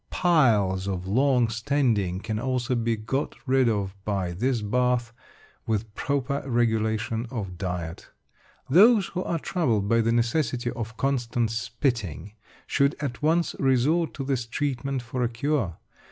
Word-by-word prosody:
Piles 110 - +2
of 95 -2 -3
long 125 +4 +3
standing 110 -6 0
can 110 0 -3
also 125 0 -1
be 115 -1 +1
got 115 +6 -3
rid 130 -2 +3
of 100 -3 -1
by 95 -4 -1
this 115 +5 -1
bath, 125 +1 +1 0.5
with 110 -1 -2
proper 140 +2 -1
regulation 115 -2 0
of 95 -8 -5
diet. 90 -3 -4 0.6
Those 200 - +6
who 180 +1 -3
are 170 - -1
troubled 120 - 0
by 115 +2 +3
the 115 +1 +1
necessity 120 +1 0
for 115 -1 -4
constant 120 -4 0
spitting 115 - -2 0.3
should 140 +1 +2
at 140 -3 -4
once 165 +3 +1
resort 140 +6 +2
to 140 - -4
this 130 -3 -1
treatment 135 +1 -2
for 125 +1 -4
a 120 - +1
cure. 120 - -1
120 Hz, 140 wpm, -26 LUFS, 110-135 Hz, 0.6 s, Those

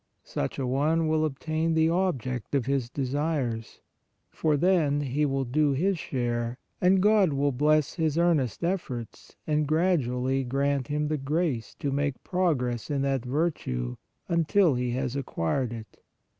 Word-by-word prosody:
Such 70 - -3
a 135 - -1
one 155 +6 +1
will 155 0 +2
obtain 155 +2 -1
the 160 0 +4
object 135 - -1
of 135 -4 +1
his 135 -3 0
desires, 135 -4 -2 0.5
for 155 -2 +1
then 155 -4 +2
he 145 +2 0
will 135 -1 -1
do 145 +3 +2
his 180 +6 +1
share 120 -3 -2 0.2
and 185 +1 +4
God 205 -6 +4
will 140 +1 +1
bless 150 +3 +2
his 160 -3 0
earnest 165 - +1
efforts 160 - -4
and 150 -1 +1
gradually 135 -6 +1
grant 135 0 0
him 150 +1 -1
the 155 0 0
grace 140 -4 -1
to 140 - -3
make 140 -1 -1
progress 135 - 0
in 140 -2 0
that 135 -3 0
virtue, 125 - -2 0.3
until 170 0 +3
he 125 0 -1
has 130 +1 -2
acquired 125 - -1
it. 115 -2 -9
140 Hz, 150 wpm, -27 LUFS, 125-160 Hz, 0.5 s, the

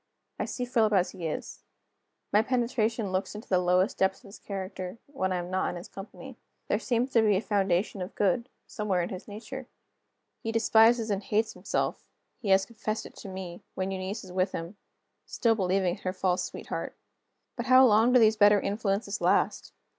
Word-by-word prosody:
I - - 0
see 250 - -3
Philip 225 -3 +2
as 185 -2 +3
he 170 -3 -5
is. 155 - -5 0.7
My 210 - +6
penetration 230 -3 0
looks 190 +2 -2
into 210 - -9
the 185 - +3
lowest 180 +5 +2
depths 190 +5 +1
of 205 - -13
his 200 - -12
character 190 0 -6
when 190 -10 -2
I - - +1
am 175 +1 -5
not 185 0 0
in - - -5
his 175 +4 -8
company. 225 +6 -10 0.3
There 205 - +2
seems 245 +2 0
to 230 - +5
be 210 -2 +4
a - - +2
foundation 195 -2 0
of 180 - -6
good, 210 +5 +1 0.2
somewhere 205 -6 -1
in - - -4
his 185 -1 -7
nature. 235 +5 -8 0.7
He 225 - -3
despises 225 0 +4
and 200 -1 0
hates 215 +2 0
himself - - -3 0.3
(he 215 - -4
has 190 0 +5
confessed 215 0 -4
it - - -12
to 195 - -8
me), 185 -2 -7
when 190 +1 -2
Eunice 190 +3 -4
is 185 - -11
with 185 +1 0
him 170 +5 -5 0.5
still 230 -2 +2
believing 190 -2 +1
in - - -19
her 185 - -2
false 185 -1 0
sweetheart. - - -5 0.6
But 240 0 -4
how 260 +1 +8
long 225 +1 +5
do 250 - +6
these 220 -1 +5
better 205 -1 +6
influences 200 0 -2
last? - - +1
205 Hz, 195 wpm, -28 LUFS, 185-225 Hz, 0.7 s, how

